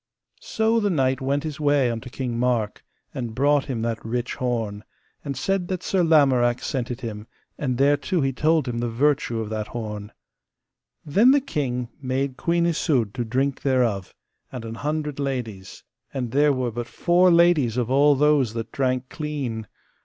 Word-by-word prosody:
So 230 - +1
the 205 -2 +1
knight 135 -6 +1
went 140 +2 0
his 155 -2 -5
way 145 -4 +3
unto 115 +2 -6
King 125 -2 -3
Mark, 120 -4 0 0.3
and 120 -3 -5
brought 145 +2 +3
him 115 -4 -3
that 115 -1 -2
rich 120 +2 -2
horn, 115 -5 -2 0.4
and 140 -3 -4
said 185 +6 -1
that 185 -1 -3
Sir 190 -2 +1
Lamorak 130 -7 +3
sent 125 -4 -2
it 125 +1 -5
him, 110 -2 -6 0.3
and 130 -4 -2
thereto 145 +6 +2
he 135 -1 0
told 155 +2 +2
him 120 -1 -2
the 120 0 -1
virtue 120 -1 +1
of 110 -1 -4
that 110 -1 -3
horn. 105 -3 -6 0.9
Then 205 - +4
the 285 +2 +6
king 130 - -3
made 130 0 -1
Queen 170 +3 +1
Isoud 145 - +1
to 120 - -2
drink 130 +4 -1
thereof, 120 -8 0 0.4
and 125 -3 -6
an 115 - -6
hundred 150 +3 -3
ladies, 120 -9 -4 0.3
and 125 -4 -3
there 145 +2 +4
were 130 -3 -1
but 120 +1 -5
four 180 +1 +3
ladies 170 -9 +4
of 125 0 -1
all 145 +2 +5
those 140 -5 +2
that 115 0 -4
drank 130 -1 -1
clean. 135 -9 -4
130 Hz, 175 wpm, -24 LUFS, 120-150 Hz, 0.9 s, the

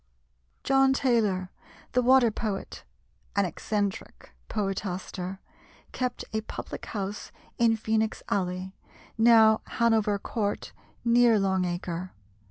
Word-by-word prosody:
John 270 0 +4
Taylor, 215 -9 +1 0.4
the 250 - +2
"Water 250 -2 +5
Poet" 210 -2 -4 0.5
an 200 -1 +3
eccentric 200 - -3 0.2
poetaster, 190 -2 -3 0.5
kept 250 -1 -3
a 220 - 0
public 220 - -7
house 200 -1 -5 0.3
in 230 -1 +4
Phœnix 220 0 -1
Alley, 185 -1 -2 0.4
now 225 -1 +6 0.2
Hanover 220 -3 +3
Court, 205 0 -3 0.3
near 235 -1 +5
Long 190 -2 +1
Acre. 175 0 -4
210 Hz, 100 wpm, -27 LUFS, 190-230 Hz, 0.5 s, now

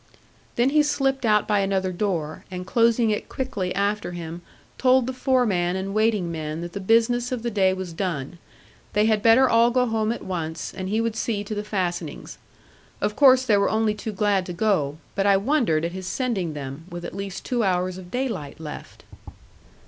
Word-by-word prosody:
Then 245 +3 +2
he 305 +1 +5
slipped 270 -4 0
out 210 -1 +3
by 210 -1 +2
another 195 -1 0
door, 175 -5 -2
and 180 -1 -6
closing 230 +2 +3
it 210 - -3
quickly 210 -9 -3
after 200 -2 -1
him, 170 0 -6 0.4
told 255 -1 +4
the 260 - -3
foreman 225 -9 +1
and 190 +1 -3
waiting 215 -5 +1
men 155 0 -4
that 175 0 -6
the - - -4
business 230 +5 +2
of 245 -3 -3
the 235 - -1
day 195 -3 +3
was 185 -2 -5
done. 170 -3 -3 0.5
They 210 +1 +3
had 215 -1 +2
better 230 +4 +6
all 230 0 +4
go 250 +1 +2
home 220 -2 0
at 235 - -5
once; 165 -3 -4
and 185 0 -5
he 220 +3 +1
would 230 -1 -1
see 220 -2 -2
to 205 - -5
the 205 0 -3
fastenings. 175 -6 -4 0.6
Of 210 +1 -1
course 260 -2 +6
they 210 -4 +4
were 200 - +2
only 220 -1 +1
too 210 +1 -5
glad 205 -2 +1
to 175 - -4
go; 170 -7 0 0.2
but 200 0 0
I 200 -1 +5
wondered 205 - +1
at 170 - -2
his 185 0 -6
sending 200 - -1
them, 140 +2 -7
with 175 0 -7
at - - -7
least 195 -1 -6
two 245 -2 0
hours 185 -1 0
of 180 -1 -11
daylight 225 - -3
left. 155 -2 -9
205 Hz, 200 wpm, -24 LUFS, 180-230 Hz, 0.6 s, better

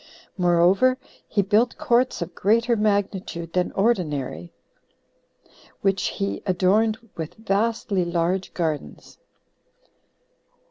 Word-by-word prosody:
Moreover, 180 +8 +3 0.3
he 200 - +1
built 215 +5 +2
courts 245 -5 +1
of 170 +1 -10
greater 230 +6 +2
magnitude 200 -5 -1
than 180 -1 0
ordinary, 150 - -1 1.3
which 195 -1 +1
he 195 -1 -3
adorned 200 +4 +2 0.2
with 160 -2 -6
vastly 215 -2 0
large 175 +2 -1
gardens. 155 - -4
195 Hz, 90 wpm, -23 LUFS, 170-220 Hz, 1.3 s, Moreover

